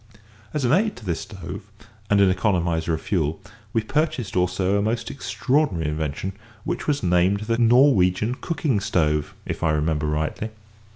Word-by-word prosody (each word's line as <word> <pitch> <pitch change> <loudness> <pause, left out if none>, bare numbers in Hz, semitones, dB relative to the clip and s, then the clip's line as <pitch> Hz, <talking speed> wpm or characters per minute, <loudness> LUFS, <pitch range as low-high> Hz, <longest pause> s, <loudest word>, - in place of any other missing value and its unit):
As 150 -4 -1
an 120 - +2
aid 205 +7 +2
to 115 - -12
this 85 -3 -1
stove, 95 +1 -8 0.4
and 105 -2 +4
an 95 -2 +5
economiser 85 -4 0
of 80 - -7
fuel, 80 -5 0 0.3
we 110 0 0
purchased 135 -3 -1
also 90 +2 +1
a 100 - +2
most 110 +3 -1
extraordinary 110 - 0
invention, 80 +5 -3 0.3
which - - -3
was 145 -5 0
named 90 +3 +3
the 115 +2 -1
"Norwegian 115 -4 +4
cooking 140 - -1
stove" 75 -6 0
if - - -4
I - - +2
remember 75 0 0
rightly. 80 +8 -2
95 Hz, 160 wpm, -23 LUFS, 85-115 Hz, 0.4 s, an